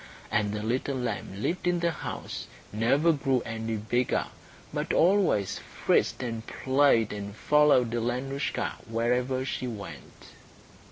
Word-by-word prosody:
And 105 -1 +1
the 105 0 -3
little 130 +4 -1
lamb 110 -4 -4
lived 180 +1 -1
in 175 -1 +2
the 170 0 +1
house, - - -6 0.2
and 105 - -5
never 145 +8 +4
grew 135 -4 +1
any 115 -1 -3
bigger, 120 +4 0 0.5
but - - -1
always 175 - +3
frisked - - 0
and 115 -2 -3
played, 130 -5 +3
and 100 0 -6
followed 145 -3 +4
Alenoushka 125 +4 -2
wherever 125 +3 0
she 130 -1 -3
went. 100 - -9
125 Hz, 130 wpm, -28 LUFS, 110-140 Hz, 0.5 s, never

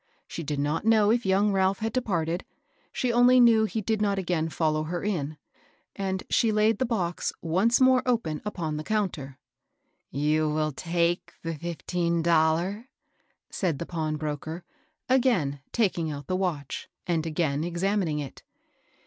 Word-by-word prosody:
She - - -6
did 150 -2 -3
not 145 +3 -1
know 215 -1 +4
if 235 -3 +1
young 200 +2 +3
Ralph 190 0 +2
had 225 0 -3
departed; 175 -8 -1 0.5
she 250 -2 -1
only 245 +1 +6
knew 230 -2 +6
he 220 0 -2
did 215 +1 -1
not 200 -1 +1
again 170 -4 -1
follow 155 0 0
her 175 +2 -4
in, 155 -7 -2 0.6
and 190 -1 -2
she 230 -2 +2
laid 215 0 +2
the 255 - +1
box 180 -7 -1
once 190 +8 +2
more 260 -1 +5
open 195 -12 0
upon 170 -7 -3
the 155 - -4
counter. 160 -10 -2 0.7
"You 150 +2 +1
vill 155 0 0
take 170 +3 -1
de 165 0 -2
fifteen 170 +1 -2
dollar?" 170 +7 +2 0.6
said 170 -7 -1
the 170 - -4
pawnbroker, 155 0 -4 0.4
again 235 - +2
taking 180 -8 0
out 145 -2 -6
the 185 - -1
watch, 170 -7 -3 0.2
and 170 -3 0
again 155 -2 0
examining 175 -1 0
it. 145 -3 -6
175 Hz, 150 wpm, -27 LUFS, 155-210 Hz, 0.7 s, only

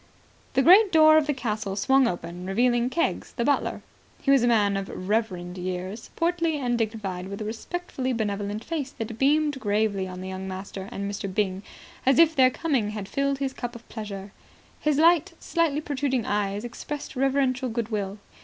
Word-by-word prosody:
The 265 - +3
great 385 +5 +7
door 310 -1 +7
of 310 -1 +3
the 295 - +2
castle 215 -5 -3
swung 265 +5 +4
open, 175 -1 -5
revealing 240 +4 +2
Keggs, 335 +6 -1
the 235 - -1
butler. 285 0 0 0.4
He 275 - +1
was 275 -2 +6
a 240 - +3
man 210 -4 +3
of 195 0 -3
reverend 185 -3 -2
years, 185 +4 -5
portly 335 -2 +1
and 245 -4 0
dignified, 210 -5 -3
with 200 +1 -6
a 215 - -4
respectfully 260 +3 -4
benevolent 205 -2 -2
face 305 -3 -3
that 225 -1 -5
beamed 290 0 +2
gravely 205 -3 0
on 185 0 -7
the 190 - -6
young 190 0 -5
master 190 +1 -6
and 200 -3 -4
Mr. 200 -1 -4
Byng, 190 -1 -1 0.4
as 265 0 +4
if 330 -1 +6
their 260 -2 +6
coming 255 -6 0
had 210 -2 -5
filled 275 +4 0
his 270 -1 -2
cup 240 -2 -5
of 235 - -12
pleasure. 200 -3 -7 0.5
His 300 -2 +1
light, 330 0 +4
slightly 325 -4 0
protruding 275 -5 -1
eyes 205 0 -1
expressed 290 +5 -6
reverential 265 -1 +1
good 230 -1 -2
will. 205 -2 -3
230 Hz, 180 wpm, -26 LUFS, 200-275 Hz, 0.5 s, great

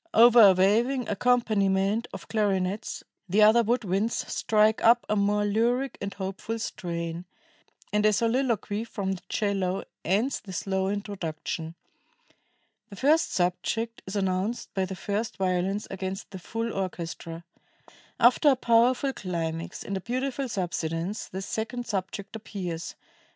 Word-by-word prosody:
Over 235 +1 +8
a 200 -3 +9
waving 230 +7 +2
accompaniment 210 -2 +2
of - - -9
clarinets, 200 -1 -1 0.3
the 210 +4 +5
other 220 +3 +7
wood 240 +2 +1
winds 200 +4 0 0.2
strike 215 0 +2
up 235 +1 +5
a 210 - +1
more 205 0 +2
lyric 240 +5 0
and 200 0 -3
hopeful 195 +4 -4
strain, 170 -5 -4 0.7
and 210 0 +2
a 215 - +5
soliloquy 225 -1 0
from 200 -4 -3
the 190 - -4
'cello 195 -3 0 0.2
ends 210 - +1
the 190 -3 -10
slow 190 +1 -1
introduction. 170 -5 -4 1.1
The 200 - -10
first 310 - +3
subject 225 +6 -1
is 190 - -5
announced 190 +3 -1
by 190 -1 0
the 190 +1 -6
first 205 +5 -3
violins 190 +2 0
against 190 +1 -5
the 190 - -7
full 225 +5 -3
orchestra.... 170 -3 -5 0.8
After 250 +5 +6
a 270 - +5
powerful 250 +3 +3
climax 165 -5 -4
and 200 - -4
a 190 - -3
beautiful 260 +4 -2
subsidence,... 175 0 -3
the 190 +1 -6
second 230 +4 -3
subject 200 0 -4
appears 185 -6 -5
205 Hz, 135 wpm, -27 LUFS, 190-230 Hz, 1.1 s, a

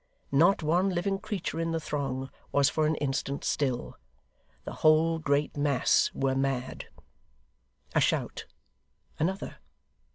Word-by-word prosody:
Not 165 +6 +4
one 175 +5 +2
living 195 +2 -1
creature 190 -6 -4
in 165 0 -1
the 165 - 0
throng 135 -3 -3 0.2
was 140 -1 +4
for 155 -1 +1
an 155 - +1
instant 140 0 -2
still. 130 -4 -1 0.7
The - - -5
whole 160 +1 +4
great 145 -1 0
mass 145 -2 +2
were 135 -1 +1
mad. 135 -1 -2 1.1
A - - +3
shout! - - -1 0.7
Another! 190 +5 -2
150 Hz, 125 wpm, -29 LUFS, 135-165 Hz, 1.1 s, Not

